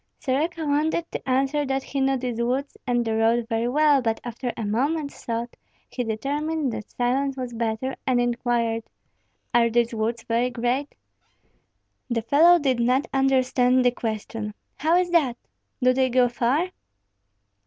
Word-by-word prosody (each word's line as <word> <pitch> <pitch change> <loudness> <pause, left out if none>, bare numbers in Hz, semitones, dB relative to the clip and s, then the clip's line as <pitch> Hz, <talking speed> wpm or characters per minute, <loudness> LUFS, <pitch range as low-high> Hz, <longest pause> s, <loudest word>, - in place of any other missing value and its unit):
Soroka 315 +5 -1
wanted 305 +3 +1
to - - -5
answer 270 +3 +1
that 270 -1 -1
he 275 - -3
knew 270 0 +2
these 245 -2 -3
woods 260 +4 -1
and 240 -1 +1
the 225 -1 0
road 225 +1 +2
very 230 0 0
well; 290 +1 +4
but 225 -2 -1
after 240 +1 -4
a 225 - -3
moment's 280 +8 -1
thought 235 +1 -3 0.4
he 250 - -2
determined 280 +5 -2
that 215 - -6
silence 265 +3 -1
was 250 -2 -4
better, 230 +3 -2
and 255 -2 +3
inquired, 240 -1 0 0.7
"Are 235 -1 +4
these 235 0 +1
woods 225 +1 -2
very 235 +2 0
great?" 250 +4 -2 1.1
The 230 -2 -1
fellow 315 +9 +6
did 265 -6 0
not 250 +4 +2
understand 255 -1 +3
the 245 - +5
question. 220 -2 -4 0.2
"How 320 +3 +2
is 360 -1 +1
that?" 280 -9 +2 0.5
"Do 255 0 +5
they 260 0 +2
go 250 0 +4
far?" 255 +9 0
250 Hz, 155 wpm, -24 LUFS, 235-275 Hz, 1.1 s, fellow